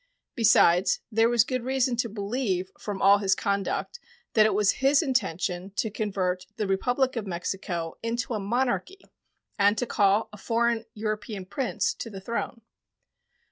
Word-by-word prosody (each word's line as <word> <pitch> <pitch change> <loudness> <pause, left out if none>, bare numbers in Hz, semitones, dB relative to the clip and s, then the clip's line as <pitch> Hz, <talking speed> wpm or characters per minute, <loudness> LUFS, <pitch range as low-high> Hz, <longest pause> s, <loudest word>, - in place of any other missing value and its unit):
Besides, 195 -5 +4
there 225 +1 +3
was 240 -2 +4
good 255 +1 -2
reason 260 -1 +1
to 235 -1 0
believe 200 -3 -2
from 205 -2 -4
all 200 +1 +7
his 195 -1 +2
conduct 200 - -2 0.3
that 215 -1 +6
it - - 0
was 205 -1 +4
his 275 +4 +4
intention 190 - -1
to 220 - -1
convert 185 -4 -2
the 215 - -2
Republic 245 +7 0
of 220 -4 -3
Mexico 175 -2 -4
into 235 +1 -2
a 215 - -1
monarchy 245 - -1 0.6
and 205 +2 +4
to 245 - 0
call 205 -1 +2
a - - -9
foreign 230 +1 0
European 215 -2 -4
prince 230 +7 -1
to 230 - -7
the 195 -3 -8
throne. 230 +3 -4
215 Hz, 155 wpm, -26 LUFS, 195-240 Hz, 0.6 s, all